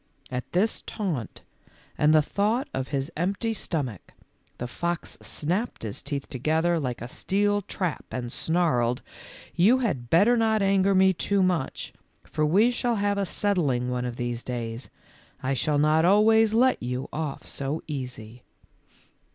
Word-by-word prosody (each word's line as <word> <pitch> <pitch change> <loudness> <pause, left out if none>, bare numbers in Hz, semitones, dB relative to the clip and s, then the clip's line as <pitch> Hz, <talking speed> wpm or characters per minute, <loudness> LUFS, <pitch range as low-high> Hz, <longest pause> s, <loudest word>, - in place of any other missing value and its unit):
At 125 -1 -4
this 195 +5 +1
taunt 165 - -4 0.5
and 150 0 +3
the 155 -1 +5
thought 215 - 0
of 130 0 -2
his 140 +2 -2
empty 195 +7 -1
stom 160 -9 -1
ach, 95 - -15 0.6
the 125 - -4
fox 170 +7 -3
snapped 185 - -2
his 105 -3 -4
teeth 140 -2 -4
together 160 +6 +1
like 125 -5 -3
a - - -5
steel 205 +8 0
trap 185 -4 -3
and 120 -2 -4
snarled, 125 -9 +1
w - - -24 0.5
You 215 +9 +6
had 135 - -2
better 205 +9 +5
not 220 -2 +2
anger 195 0 +3
me 190 0 +5
too 195 +2 +1
much, 180 -7 -1 0.3
for 155 - -2
we 205 +10 +4
shall 240 -1 0
have 200 -1 0
a 195 - 0
settling 145 -14 0
one 125 0 -1
of 120 -1 -4
these 120 -1 -3
days. 120 -1 -4 0.5
I 130 +1 0
shall 145 +3 +1
not 155 +2 +4
always 215 +4 +5
let 250 +4 +3
you 125 +2 -3
off 150 -3 -4
so 140 +3 -4
easy." 125 -5 -6
160 Hz, 160 wpm, -26 LUFS, 130-200 Hz, 0.6 s, You